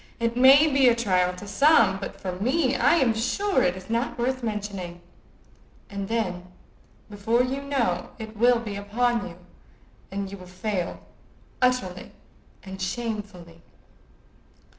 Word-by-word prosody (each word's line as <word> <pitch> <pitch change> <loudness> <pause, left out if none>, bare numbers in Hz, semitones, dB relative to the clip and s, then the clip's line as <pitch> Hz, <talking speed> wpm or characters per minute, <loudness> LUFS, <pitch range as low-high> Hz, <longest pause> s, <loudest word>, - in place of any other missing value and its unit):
It 230 0 -1
may 265 +4 +7
be 275 -4 +4
a 235 - +3
trial 185 -6 +1
to 205 +3 -10
some, 220 -4 +4
but 195 - -7
for 185 - -4
me 255 - 0
I - - +4
am 260 -8 +3
sure 380 - 0
it 180 +1 +1
is 185 - -11
not 235 +4 -2
worth 255 +2 -1
mentioning.' 200 -6 -5 0.9
And 200 -1 -4
then, 185 -6 -2 0.6
before 220 +4 0
you 265 +2 -3
know, 240 -11 -1
it 220 -1 -8
will 240 +3 +4
be 220 -3 -5
upon 230 +3 -1
you, 170 - -13 0.7
and 195 0 -4
you 200 - -8
will 180 - -12
fail 185 0 -4 0.6
utterly 250 -8 0 0.5
and 190 0 -9
shamefully." 200 -6 -5
215 Hz, 140 wpm, -25 LUFS, 190-245 Hz, 0.9 s, may